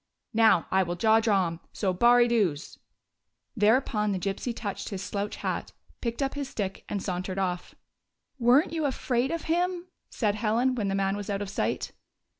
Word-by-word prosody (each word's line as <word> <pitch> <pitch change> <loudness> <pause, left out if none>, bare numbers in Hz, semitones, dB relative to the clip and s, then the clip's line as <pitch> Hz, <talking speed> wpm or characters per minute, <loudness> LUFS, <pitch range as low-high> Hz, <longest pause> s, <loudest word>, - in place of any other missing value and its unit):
Now, 220 -6 +5
I 190 - +4
will 175 -1 -2
jaw 220 +4 +4
drom. 190 -7 +1
So, 190 -3 0
baurie 240 +5 +5
dews 195 -10 0 0.4
." - - -54
Thereupon 210 -1 +2
the - - -1
Gypsy 195 +6 -2
touched 210 -4 -5
his 195 -2 -5
slouch 200 +1 -3
hat, - - -4 0.3
picked 235 +3 -2
up 270 - -1
his 285 -2 -4
stick 195 -5 -4
and 200 -2 -3
sauntered 185 0 -3
off. 180 -2 -2 0.3
" - - -52
Were 245 +5 +5
n't - - -10
you 320 -2 -1
afraid 255 -2 0
of 335 0 -3
him? 355 +2 -1
" - - -54
said 210 -4 0
Helen, 225 +5 +1
when 220 -5 -1
the 195 - 0
man 195 0 +1
was 205 0 -6
out 200 0 -1
of 195 - -7
sight. - - -2
210 Hz, 195 wpm, -27 LUFS, 195-245 Hz, 0.4 s, Now